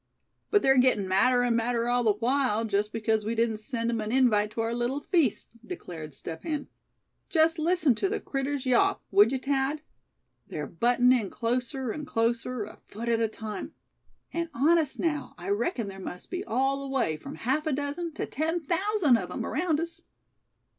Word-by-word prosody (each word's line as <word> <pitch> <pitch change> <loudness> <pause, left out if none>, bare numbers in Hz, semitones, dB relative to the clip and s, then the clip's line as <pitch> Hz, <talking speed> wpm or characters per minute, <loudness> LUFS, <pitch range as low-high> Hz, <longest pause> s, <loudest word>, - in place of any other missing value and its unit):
"But 415 - +3
they're 270 -1 +5
gettin' 250 -6 +3
madder 245 +7 +3
and 240 -1 +2
madder 235 0 0
all 245 0 +2
the 215 -2 +4
while, 235 0 +1
just 210 0 0
because 220 -1 0
we 225 +2 -2
didn't 225 -1 +1
send 230 +1 -2
'em 230 -2 -1
an 215 0 -3
invite 230 -5 +3
to 225 - -1
our 225 +1 -1
little 240 +4 -1
feast!" 300 - +1
declared 160 - -8
Step 160 +3 -6
Hen. 300 -3 -3 0.6
"Just 325 0 +3
listen 320 -4 +3
to 380 - -1
the 430 - -1
critters 275 0 -3
yawp, 255 -2 +3
would 205 +4 +6
you, 270 - +1
Thad? 275 +3 -1 0.6
They're - - -4
buttin' 245 +1 +3
in 225 -6 0
closer 245 +1 -2
and 300 +5 -6
closer, 230 +1 0
a 210 - -10
foot 235 +3 -7
at 230 -1 +2
a 225 - +3
time. 215 -1 -6 0.6
And 335 0 -2
honest 310 +2 +2
now, 310 -3 -1
I - - -6
reckon 345 - 0
there 195 -1 -8
must 180 -1 -8
be 365 0 -3
all 270 - 0
the 275 - -6
way 255 -13 +1
from 155 - -9
half 265 - -1
a - - +1
dozen 290 +5 -2
to - - -3
ten 320 +4 -1
thousand 345 - +2
of - - -5
'em - - -4
around 315 0 0
us." 335 +1 -4
250 Hz, 190 wpm, -28 LUFS, 225-300 Hz, 0.6 s, would